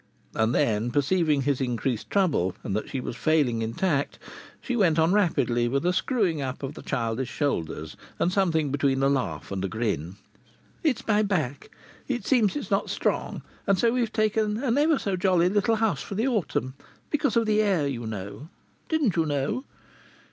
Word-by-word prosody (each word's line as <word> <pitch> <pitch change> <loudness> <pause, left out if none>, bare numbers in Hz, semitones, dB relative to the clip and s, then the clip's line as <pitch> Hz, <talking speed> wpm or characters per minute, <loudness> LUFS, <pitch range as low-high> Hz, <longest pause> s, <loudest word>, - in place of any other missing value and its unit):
And 110 +3 +1
then, 115 -5 +1
perceiving 150 +1 +2
his 140 -1 0
increased 125 -2 -2
trouble, 155 - +1
and 100 - -2
that 110 - -3
she 135 - -3
was 125 - -5
failing 125 -3 +2
in 115 +1 -3
tact, 155 -7 0 0.4
she 255 - -3
went 180 -8 +3
on 165 +3 +3
rapidly, 125 - +2
with 140 +6 -1
a 180 - +3
screwing 185 - 0
up 130 0 -4
of 135 +1 -4
the - - -10
childish 120 -1 -2
shoulders 80 - -2 0.2
and 180 - +1
something 160 -7 +1
between 135 -1 +1
a 135 - +4
laugh 135 -7 -2
and 95 -1 -2
a - - 0
grin: 95 -5 -2 0.7
"It's 295 -8 0
my 210 -1 +4
back. 160 -10 -1 0.4
It 250 -3 -2
seems 230 -7 +3
it's 295 - -5
not - - +1
strong. - - -1 0.2
And 195 - +4
so 230 +5 +3
we've 240 -2 0
taken 215 +1 0
an 245 -3 +2
ever 305 0 +4
so 200 -6 -1
jolly 180 -1 +3
little 210 +3 +2
house 215 -10 0
for 200 - -6
the 225 +6 +1
autumn, 180 - -1 0.4
because 280 -6 +1
of 230 - +3
the 215 0 +3
air, 190 -8 +2
you 120 -5 -3
know. 105 - -6 0.4
Didn't 300 - +1
you 165 -2 +1
know?" 145 - -1
155 Hz, 185 wpm, -26 LUFS, 125-210 Hz, 0.7 s, a